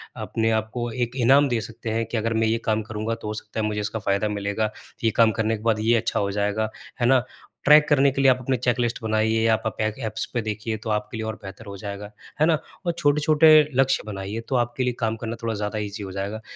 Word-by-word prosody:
अपने 115 0 -1
आप 110 0 0
को 120 -1 -2
एक 120 +1 -2
इनाम 135 +4 +5
दे 120 - +1
सकते 110 +1 -7
हैं 115 +1 0
कि 115 +1 -3
अगर 115 +1 0
मैं 110 0 +2
ये 115 +1 +2
काम 110 0 +1
करूँगा, 110 +1 -3
तो 115 - -9
हो 105 - -2
सकता 110 +1 -6
है, 110 - 0
मुझे 105 -1 -1
इसका 110 +2 -3
फ़ायदा 100 0 0
मिलेगा। 105 +1 -1 0.3
ये 115 - +3
काम 115 -1 +6
करने 110 0 0
के 105 - -13
बाद 115 -2 +2
ये 115 +2 +3
अच्छा 110 - -1
हो 100 -1 0
जाएगा। 105 +2 0 0.3
है - - +3
ना? 130 -1 +4 0.4
ट्रैक 150 +1 +7
करने 140 -1 +4
के 135 - -1
लिए 135 -1 +6
आप 130 - +1
अपनी 130 +1 0
चेक-लिस्ट 120 0 0
बनाइए 110 0 +1
या 110 -1 +5
पा 110 0 -2
आप - - -7
एग 110 +3 -1
एप्स 110 0 -3
पे 120 - 0
देखिए, 110 +1 -3
तो 110 +1 -7
आपके 105 +1 -2
लिए 110 - -3
और 110 - -3
बेहतर 100 +3 -9
हो 100 -1 -8
जाएगा। 100 +1 -7 0.3
है 155 - +5
ना? 160 -1 +3 0.3
और 170 - +2
छोटे-छोटे 150 0 +4 0.3
लक्ष्य 135 0 +1
बनाइए, 100 +1 -5
तो 130 - 0
आपके 120 +1 0
लिए 125 0 0
काम 115 -1 0
करना 115 0 -3
थोड़ा 115 -1 -1
ज़्यादा 105 +1 -3
ईज़ी 105 0 -5
हो 95 - -6
जाएगा। 100 +3 -4
110 Hz, 255 wpm, -24 LUFS, 105-120 Hz, 0.4 s, ट्रैक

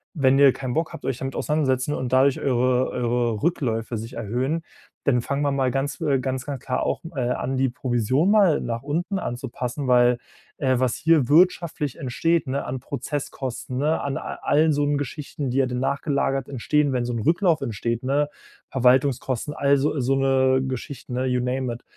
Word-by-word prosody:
wenn 135 -3 +3
ihr 140 -1 +8
keinen 130 -2 -4
Bock 160 0 -1
habt, - - -9
euch 135 -3 -1
damit 135 0 -4
auseinandersetzen 145 -2 0
und 130 -2 -3
dadurch 130 +1 +4
eure 125 -1 +1
eure 120 -2 -1
Rückläufe 115 -9 -1
sich 115 +3 -7
erhöhen, 125 +8 -2 0.4
dann 125 -3 +3
fangen 140 +4 -2
wir 140 - +1
mal 135 -2 +1
ganz 135 +3 -2
äh, 140 -2 +2
ganz, 130 0 -3
ganz 140 -4 -5
klar 125 - -1
auch, - - -1
äh, - - -2
an 130 +1 -2
die 130 0 +2
Provision 125 - 0
mal 195 -8 +4
nach 115 0 -3
unten 170 +7 -2
anzupassen.“ 125 0 -4
Weil, 125 -1 +5 0.4
äh, 130 -3 +1
was 130 -2 +1
hier 155 -6 +3
wirtschaftlich 160 -3 +2
entsteht, 165 +4 0
ne, 135 +2 -2
an 130 0 -4
Prozesskosten, 135 -2 -5
ne? 150 +4 +1
An 140 -1 -2
a - - -6
allen 155 +1 +3
so 145 - +1
'n 145 0 +1
Geschichten, 145 0 -4
die 130 - -1
ja 135 - +4
dann 125 0 -3
nachgelagert 135 -1 0
entstehen, 145 +2 +1
wenn 120 -1 0
so 120 - -3
'n 115 - -2
Rücklauf 165 - +2
entsteht, 115 -1 -2
ne? 145 +3 +1 0.4
Verwaltungskosten, 130 +1 +2
all 140 0 +3
so 145 +1 0
so 130 +2 +1
'ne 130 -1 +3
Geschichten, 130 0 -6
ne, 130 +1 0
you 125 -1 +1
name 125 -1 -1
it. 120 - -10
135 Hz, 190 wpm, -24 LUFS, 125-145 Hz, 0.4 s, ihr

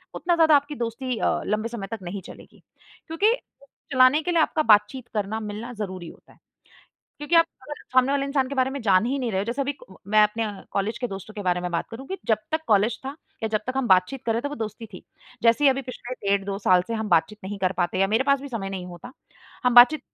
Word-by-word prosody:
उतना 345 0 +1
ज़्यादा 320 -2 +5
आपकी 285 +1 0
दोस्ती 240 +1 -3
अ, - - 0
लंबे 215 +2 -1
समय 220 -5 -6
तक 225 - -4
नहीं 185 +3 -5
चलेगी - - -14 0.4
क्योंकि 390 +8 +2 0.6
चलाने 255 +3 +5
के 355 - -1
लिए 335 -2 +3
आपका 310 0 +1
बातचीत 210 +5 0
करना, 210 +1 -1
मिलना 215 +3 -6
ज़रूरी 185 -5 -6
होता - - -18
है। - - -27 0.8
क्योंकि 295 +3 -2
आप 330 - +7 0.2
अगर 295 +3 -7 0.2
सामने 255 +2 +4
वाले 280 -1 +1
इंसान 275 -2 0
के 280 - -5
बारे 260 -1 +1
में 280 +1 -5
जान 195 -2 +4
ही 270 +3 -1
नहीं 245 -3 -2
रहे 190 +1 0
जैसे 240 +5 -2
अभी 285 +1 -2 0.3
मैं 215 +1 +5
अपने 220 +2 +1 0.3
कॉलेज 200 +3 -1
के 245 - -2
दोस्तों 195 +1 -8
के 210 - -5
बारे 180 -1 0
में 180 - -3
बात 170 - -1
करूँ 245 +4 -9
कि 385 - -3
जब 220 -2 +3
तक 315 - +1
कॉलेज 215 +2 +3
था 275 +2 -6 0.3
या 220 - 0
जब 215 -1 0
तक 255 - -2
हम 270 -2 0
बातचीत 185 +8 +2
कर 225 - +2
रहे 230 - -1
थे 285 - -2
वो 295 - -6
दोस्ती 220 0 -6
थी। - - -10 0.4
जैसे 230 +5 +4
ही 280 - +7
अभी 270 +1 -1
पिछले 255 -1 -8 0.2
डेढ़ 200 0 +2
2 195 0 -3
साल 185 -3 +4
से 230 - -2
हम 220 -1 -3
बातचीत 210 +6 +2
नहीं 200 +1 -5
कर 185 -1 0
पाते 180 +1 0
या 195 - +4
मेरे 225 +6 +1
पास 280 -1 +2
भी 280 - -7
समय 205 -6 -4
नहीं 190 -2 -5
होता। 180 +8 -10 0.5
हम 250 -1 +3
बातचीत 255 +5 +8
230 Hz, 250 wpm, -24 LUFS, 200-270 Hz, 0.8 s, बातचीत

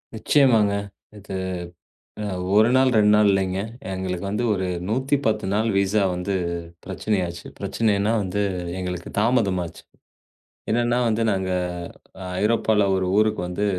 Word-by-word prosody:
நிச்சயமாங்க. 110 -4 +3 0.4
இது 100 -1 -8 0.9
அ - - -3 0.3
1 110 +2 +6
நாள், 130 0 +5
2 105 -1 +5
நாள் 105 0 +5
இல்லைங்க. 95 -1 0 0.3
எங்களுக்கு 95 0 -3
வந்து 105 +4 -1
ஒரு 95 -2 -2 0.2
110 130 -2 0
நாள் 110 +2 +1
விசா 100 +2 +2
வந்து 90 +2 -3 0.5
பிரச்சனை 100 +2 -1
ஆச்சு. 85 0 -8
பிரச்சனை 105 +3 0
என்ன 105 +2 +1
வந்து 100 +1 -2 0.4
எங்களுக்குத் 90 -1 -5
தாமதம் 105 -5 +2
ஆச்சு. 85 - -11 0.9
என்னன்னா 120 +1 +2
வந்து 115 0 +1
நாங்க 95 -1 -1 0.9
ஐரோப்பால 105 -1 +2
ஒரு 95 0 0
ஊருக்கு 110 -1 +2
வந்து 90 +4 -2
105 Hz, 130 wpm, -23 LUFS, 95-110 Hz, 0.9 s, 1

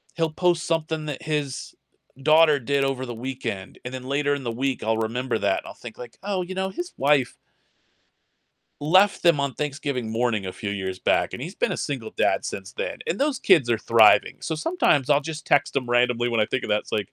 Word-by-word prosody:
he'll 165 -1 0
post 175 +1 +1
something 160 -1 -1
that 145 -3 -5
his 150 -3 -3 0.5
daughter 155 0 +5
did 140 +2 0
over 135 -1 -1
the 120 - -6
weekend, 120 -5 -6
and 125 - -6
then 130 -1 -6
later 145 +2 0
in 140 -1 -3
the 120 - -2
week 130 +3 -2
I'll 110 0 +1
remember 120 +3 -1
that - - +1
and - - -13
I'll - - -8
think 120 -2 -11
like, 120 -2 -10
"Oh, 195 -2 -1
you 185 +1 -7
know, 190 0 -1
his 350 - -6
wife" 140 -3 +2 1.5
"left 185 +7 +4
them 170 -4 +5
on 140 -1 -1
Thanksgiving 140 -5 -3
morning 110 -3 0
a 95 - -4
few 100 - -5
years 95 -2 -4
back, - - +1
and 125 - -7
he's 175 +7 -6
been - - 0
a - - -2
single - - -4
dad - - +1
since - - -6
then, - - -4
and 470 - -2
those 285 -2 +1
kids 160 -11 +4
are 120 - +3
thriving." 110 0 +4
So 160 - -3
sometimes 155 - +1
I'll 145 0 +5
just 155 +1 -7
text 140 0 +2
him 130 -3 -1
randomly 120 0 +2
when 115 -1 +1
I 105 - +2
think 125 - -2
of - - -5
that. 105 0 +3
It's - - -16
like, 105 -3 -2
135 Hz, 225 wpm, -24 LUFS, 120-160 Hz, 1.5 s, daughter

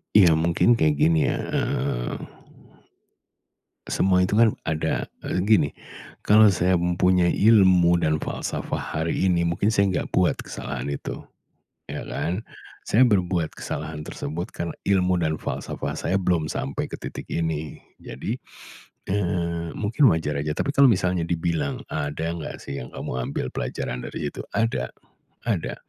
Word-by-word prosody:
Iya, 95 -5 +8
mungkin 85 +8 +3
kayak 75 -1 +3
gini 80 +2 +3
ya, - - +1 0.2
eee, - - -1 1.7
semua 90 -1 +2
itu 100 - -2
kan 115 -2 +5
ada 80 0 -1 0.2
eee, - - -1
gini 90 -10 +4 0.5
kalau 110 +1 +6
saya 90 0 +2
mempunyai 90 0 +3
ilmu 95 -5 +5
dan 75 0 +2
falsafah - - -3
hari 80 +4 -1
ini, 85 -1 +2
mungkin 85 +5 +1
saya 100 -1 +4
enggak 90 - -2
buat 90 -1 +3
kesalahan - - -5
itu, 70 - -5 0.7
ya - - -5
kan. 90 +4 -2 0.4
Saya 110 - +2
berbuat 90 -6 +1
kesalahan 75 0 -5
tersebut 80 +5 -5
karena 85 -1 -4 0.2
ilmu 90 -2 +3
dan 80 -2 -1
falsafah - - -4
saya 95 - 0
belum 85 -4 +1
sampai 70 +1 -3
ke - - -6
titik - - -6
ini. 80 -2 -2 0.2
Jadi 85 - -5 0.7
heeh, 85 -3 -1
mungkin 115 +6 +3
wajar 80 -2 -1
aja. 75 +1 -1
Tapi 140 - 0
kalau 140 -1 +7
misalnya 90 -3 0
dibilang, 80 -4 -1
ada 80 +2 -2
enggak 85 -2 -6
sih 70 - -5
yang 65 - -7
kamu 65 -1 -4
ambil - - -2
pelajaran 60 - -4
dari - - -4
itu? - - -8 0.2
Ada, 115 +2 0 0.6
ada. - - -1
85 Hz, 145 wpm, -24 LUFS, 80-95 Hz, 1.7 s, Iya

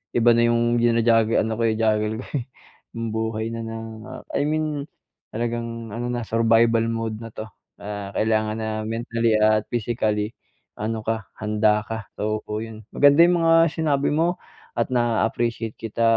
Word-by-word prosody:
Iba 120 0 +5
na 115 - +3
yung 120 0 +2
jina-juggle, 115 -1 +3
ano 110 0 -2
ko, 115 +1 -2
juggle 110 -1 +1
ko - - -12
eh, 130 -5 -2 0.5
yung 115 0 -2
buhay 110 0 -2
na 115 - -4
ng 115 0 -6 0.5
I - - +1
mean 155 -2 -1 0.4
talagang 115 0 -4
ano 120 +2 -3
na, 120 -1 -2
survival 115 0 +3
mode 115 -1 -3
na 115 - -7
'to. 110 0 -7 0.3
Ah, 100 -1 -6
kailangan 110 0 +1
na 110 -1 -3 0.2
mentally 115 -1 0
at 110 0 +3
physically 110 -2 -1 0.5
ano 110 0 -3
ka, 110 -2 -2
handa 105 0 +2
ka, 110 -1 -6
oo, 110 0 -1 0.2
yun. 110 -1 -9
Maganda 145 +2 +6
yung 175 0 +3
mga 165 0 +5
sinabi 150 -4 +1
mo 165 +4 +1 0.4
at 115 - -1
naa-appreciate 115 -1 0
kita 115 +1 -3
115 Hz, 155 wpm, -23 LUFS, 110-120 Hz, 0.5 s, Maganda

